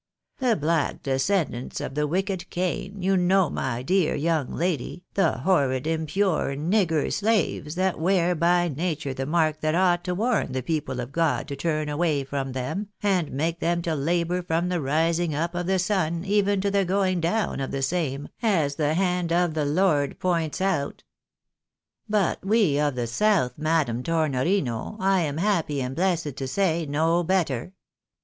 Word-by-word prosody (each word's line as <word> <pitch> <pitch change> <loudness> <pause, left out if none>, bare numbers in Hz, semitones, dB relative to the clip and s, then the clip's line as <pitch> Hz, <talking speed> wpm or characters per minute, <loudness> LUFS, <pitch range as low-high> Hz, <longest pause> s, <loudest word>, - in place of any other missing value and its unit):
The 250 -4 +2
black 160 -1 0
descendants 135 -1 -1
of - - -5
the 150 +1 0
wicked 185 +2 -2
Cain, 185 +2 -3
you 195 +1 +3
know, 185 -2 +3
my 125 -2 -2
dear 180 +3 +2
young 155 -2 0
lady, 175 0 -2
the 195 - +2
horrid 140 -8 +1
impure 160 -1 0
nigger 165 0 +1
slaves, 200 -7 0
that 185 -1 0
wear 180 +1 +2
by 175 +1 +2
nature 155 -2 -2
the 135 0 -4
mark 155 -1 +1
that 155 +1 +1
ought 175 -1 +3
to 180 - -1
warn 220 - 0
the 130 -1 -2
people 150 -3 -2
of 125 +1 -5
God 165 0 0
to 140 - -3
turn 155 +1 -1
away 150 -1 0
from 135 -1 -4
them, 130 +11 -3 0.2
and 185 -6 +1
make 165 +5 -1
them 170 0 0
to 165 - -1
labour 170 +4 0
from 170 0 -1
the 180 -2 -1
rising 160 +3 +1
up 170 +3 -1
of 175 0 -3
the 190 0 +2
sun, 175 -3 0
even 200 -1 +2
to 200 0 0
the 200 0 +2
going 185 -1 +1
down 195 +3 0
of 135 - -2
the 135 0 -3
same, 145 -3 -1
as 165 - +1
the 155 0 +1
hand 180 -2 0
of 175 -1 +2
the 155 -2 0
Lord 150 -2 +1
points 170 -4 0
out. 175 -8 -1 0.5
" - - -47
But 190 - -1
we 195 -8 +3
of 145 -3 +1
the 120 -1 -1
south, 175 - +2
Madam 155 -6 0
Tornorino, 155 - 0
I 195 0 +3
am 150 -2 -2
happy 165 -6 0
and 130 0 -3
blessed 170 -6 0
to 135 - -3
say, 165 +1 0
know 160 +4 +2
better. 170 -4 0
165 Hz, 175 wpm, -25 LUFS, 145-185 Hz, 0.5 s, you